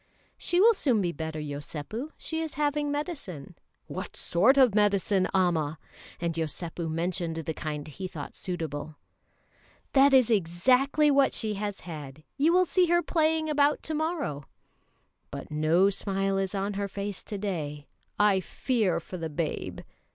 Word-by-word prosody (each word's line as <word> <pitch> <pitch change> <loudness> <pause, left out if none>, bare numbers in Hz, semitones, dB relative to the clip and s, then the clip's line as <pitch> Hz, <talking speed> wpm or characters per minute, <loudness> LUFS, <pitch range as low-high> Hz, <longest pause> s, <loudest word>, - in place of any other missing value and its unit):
"She 350 - 0
will 455 +4 +7
soon 260 - +1
be 175 -3 0
better, 160 0 -5
Yosépu; 150 - -5
she 320 0 -3
is 320 -2 -4
having 295 0 0
medicine." 290 - -5 0.3
"What - - -6
sort 225 +11 +3
of 255 -6 +6
medicine, 200 -2 +2
Amma?" 165 -5 +1 0.4
and 170 -1 -1
Yosépu 165 +1 -3
mentioned 170 +1 -2
the 160 0 -3
kind 150 -2 -5
he 185 +5 -6
thought 150 -5 -8
suitable. 155 -4 -4 1.0
"That 275 +1 +6
is 255 -3 +5
exactly 250 - +3
what 275 -1 +4
she 215 -2 -1
has 205 -1 -4
had; 155 -3 -8
you 295 +4 +3
will 365 +1 +5
see 360 +1 +3
her 345 +1 +3
playing 315 -1 +1
about 295 -1 +2
to 320 - -3
morrow." 305 - -2 0.8
"But - - -8
no 160 +6 +3
smile 195 0 -1
is 195 +1 -2
on 200 +1 -1
her 200 0 -2
face 200 0 -5
to 205 - -5
day; 155 -8 -4 0.3
I 205 -2 +4
fear 200 -3 0
for 180 +2 -8
the 165 -2 -4
babe." 155 +1 -3
195 Hz, 155 wpm, -28 LUFS, -, 1.0 s, will